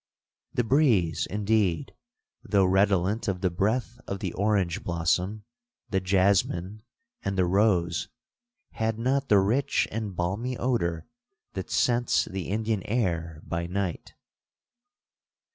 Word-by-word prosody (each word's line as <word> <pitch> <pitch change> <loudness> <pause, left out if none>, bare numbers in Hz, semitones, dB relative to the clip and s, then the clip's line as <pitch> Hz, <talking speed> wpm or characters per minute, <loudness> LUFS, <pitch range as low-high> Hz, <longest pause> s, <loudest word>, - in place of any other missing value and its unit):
'The 125 - +2
breeze, 115 - +2
indeed, 105 -4 0 0.5
though 100 -1 +3
redolent 95 +3 +2
of 95 -2 -1
the 90 -2 +1
breath 115 +7 -1
of 100 - -3
the - - -3
orange 100 -4 0
blossom, 90 +5 0 0.5
the 95 - +2
jasmine, 95 +1 +1 0.4
and 100 0 -2
the 90 - +3
rose, 90 -4 +2 0.6
had 110 -1 -1
not 135 +4 0
the 105 - +6
rich 120 +9 +2
and 105 -3 -4
balmy 105 +9 -2
odour 85 -10 -1 0.5
that - - -5
scents 120 0 +2
the 95 -3 -5
Indian 110 0 -1
air 85 -8 -1
by 85 0 -3
night. 90 -1 -3
100 Hz, 120 wpm, -27 LUFS, 90-110 Hz, 0.6 s, the